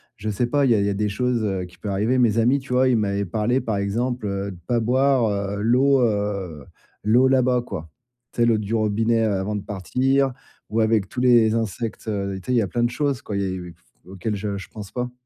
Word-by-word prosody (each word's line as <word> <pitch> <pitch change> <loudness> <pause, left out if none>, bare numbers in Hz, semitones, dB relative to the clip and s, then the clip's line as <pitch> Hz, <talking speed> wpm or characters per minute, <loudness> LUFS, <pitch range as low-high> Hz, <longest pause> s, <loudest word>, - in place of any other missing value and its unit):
je 110 -3 -5
sais 115 +4 0
pas, 145 +3 +2
il 130 - +3
y - - +5
a - - +2
il 100 - +1
y - - +1
a - - 0
des 105 +1 -1
choses 120 +1 0 0.2
qui 90 - -19
peuvent 105 - -5
arriver. 110 +6 +1
Mes 115 -3 +3
amis 125 +5 +3
tu 130 -1 -6
vois, 130 +1 +4
ils 125 - +3
m'avaient 100 -1 0
parlé, 110 +7 0
par 110 -3 -2
exemple, 115 +5 -2
heu, 100 0 -3
de 90 - -10
pas 120 -1 +2
boire 115 -5 +1
l'eau, 130 +5 +3
heu, 100 - -1 0.4
l'eau, 120 +5 +4
là-bas, 130 -1 +3
quoi. 80 -9 -7 0.4
Tu - - -3
sais, - - +5
l'eau 115 -2 +3
du 105 +1 -4
robinet 110 +1 +1
avant 105 -1 -1
de 100 - -4
partir 130 - 0 0.4
ou 110 - -1
avec 110 -3 +2
tous 125 - -5
les 120 -3 +5
insectes, 115 0 -3
tu 110 - -2 0.3
sais, 125 - -1
il - - +3
y 120 - +4
a 100 - -1
plein 120 +7 -1
de 120 - +2
choses, 135 0 -1
quoi, 105 - -5
il 100 - 0
y - - 0
a - - -1
il 95 -1 -5
y - - -9 0.4
a - - -12
auxquelles 95 +3 -3
je 100 0 -3
je 95 - -8
pense 105 -3 -9
pas. 125 0 -3
110 Hz, 255 wpm, -23 LUFS, 100-125 Hz, 0.4 s, y